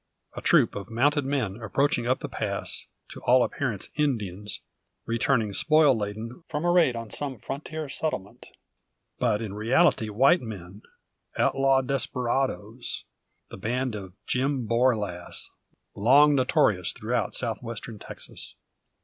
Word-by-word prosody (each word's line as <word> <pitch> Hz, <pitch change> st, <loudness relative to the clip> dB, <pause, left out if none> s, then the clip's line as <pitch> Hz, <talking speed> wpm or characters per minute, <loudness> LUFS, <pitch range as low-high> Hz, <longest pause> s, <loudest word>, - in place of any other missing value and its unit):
A -, -, -5 dB
troop -, -, +4 dB
of 100 Hz, -1 st, -7 dB
mounted 140 Hz, +5 st, +2 dB
men 120 Hz, -7 st, -2 dB
approaching 120 Hz, +2 st, +1 dB
up 130 Hz, -, +1 dB
the -, -, -3 dB
pass, -, -, -2 dB, 0.2 s
to -, -, -10 dB
all 125 Hz, 0 st, +5 dB
appearance 120 Hz, -9 st, -3 dB
Indians, 105 Hz, -, -2 dB, 0.4 s
returning 115 Hz, -2 st, +1 dB
spoil 155 Hz, +1 st, +4 dB
laden 110 Hz, -, -5 dB
from 150 Hz, +3 st, -3 dB
a 175 Hz, -, +4 dB
raid 170 Hz, -8 st, +4 dB
on 115 Hz, -2 st, -6 dB
some 140 Hz, -3 st, 0 dB
frontier 150 Hz, +6 st, -5 dB
settlement. 135 Hz, -9 st, -2 dB, 0.7 s
But 115 Hz, -3 st, +1 dB
in 105 Hz, -3 st, -5 dB
reality 110 Hz, +2 st, +2 dB
white 135 Hz, -, +4 dB
men, 100 Hz, -3 st, -8 dB, 0.6 s
outlawed 135 Hz, -1 st, +3 dB
desperadoes, 125 Hz, -3 st, -1 dB, 0.5 s
the -, -, -9 dB
band 125 Hz, +4 st, -2 dB
of 95 Hz, -3 st, -7 dB
Jim 130 Hz, 0 st, 0 dB
Borlasse, 110 Hz, -7 st, 0 dB, 0.4 s
long 140 Hz, +8 st, +5 dB
notorious 125 Hz, -, +2 dB
throughout 120 Hz, +3 st, -2 dB
South 115 Hz, -3 st, -1 dB
Western 115 Hz, -2 st, -7 dB
Texas. -, -, -9 dB
120 Hz, 130 wpm, -26 LUFS, 105-135 Hz, 0.7 s, all